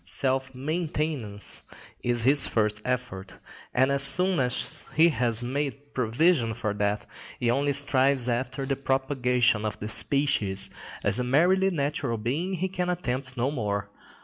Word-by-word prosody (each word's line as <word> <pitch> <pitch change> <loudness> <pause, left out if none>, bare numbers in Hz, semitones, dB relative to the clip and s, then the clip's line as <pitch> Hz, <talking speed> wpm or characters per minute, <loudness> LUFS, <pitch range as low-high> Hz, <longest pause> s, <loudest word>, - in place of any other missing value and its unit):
Self 130 +10 -2
maintenance 150 - -3 0.4
is 120 -1 +1
his 140 +4 +5
first 105 -1 0
effort, 125 -7 -4 0.4
and 130 +2 +2
as 140 0 +2
soon 180 +5 +5
as 125 -2 0
he 165 +2 +6
has 120 -6 +1
made 140 +2 -4
provision 125 0 +1
for 110 -3 -2
that, 105 0 -1 0.3
he 120 -1 +1
only 140 +3 +1
strives 135 -2 +2
after 125 +3 -2
the 135 0 -1
propagation 125 -4 +1
of 105 -1 -4
the 105 - -5
species: 135 -7 +1 0.3
as - - +3
a - - 0
merely 180 +9 +3
natural 140 -7 -2
being 150 - -2
he 185 +2 -1
can 180 -1 -3
attempt 130 -6 -3
no 125 +4 0
more. 100 -6 -3
130 Hz, 150 wpm, -26 LUFS, 115-145 Hz, 0.4 s, he